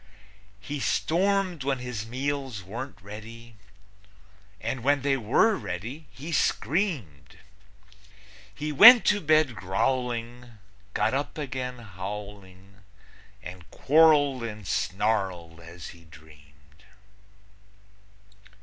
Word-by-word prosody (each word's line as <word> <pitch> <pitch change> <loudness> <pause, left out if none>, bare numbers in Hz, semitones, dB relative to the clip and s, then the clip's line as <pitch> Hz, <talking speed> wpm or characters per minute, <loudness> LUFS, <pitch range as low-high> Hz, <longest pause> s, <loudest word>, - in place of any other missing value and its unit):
He 145 +7 -6
stormed 185 +2 0
when 135 0 0
his 125 -4 -6
meals 135 -3 -4
weren't 115 +8 -7
ready, 115 +3 -11 1.0
And 115 +2 -4
when 140 0 +2
they 140 -1 +2
were 135 - +2
ready, 120 - -6
he 150 +6 -9
screamed. 135 - -1 1.2
He 150 +6 -4
went 230 - +9
to 205 - +3
bed 155 -5 +3
growling, 120 +3 -3 0.4
got 110 - +1
up 140 +4 -3
again 130 -3 -4
howling 100 -2 -9 0.7
And 90 -2 -10
quarreled 145 -3 +4
and 110 -3 -7
snarled 95 -5 -1
as 85 0 -11
he 85 -1 -15
dreamed. 75 -1 -19
115 Hz, 95 wpm, -26 LUFS, 95-145 Hz, 1.2 s, went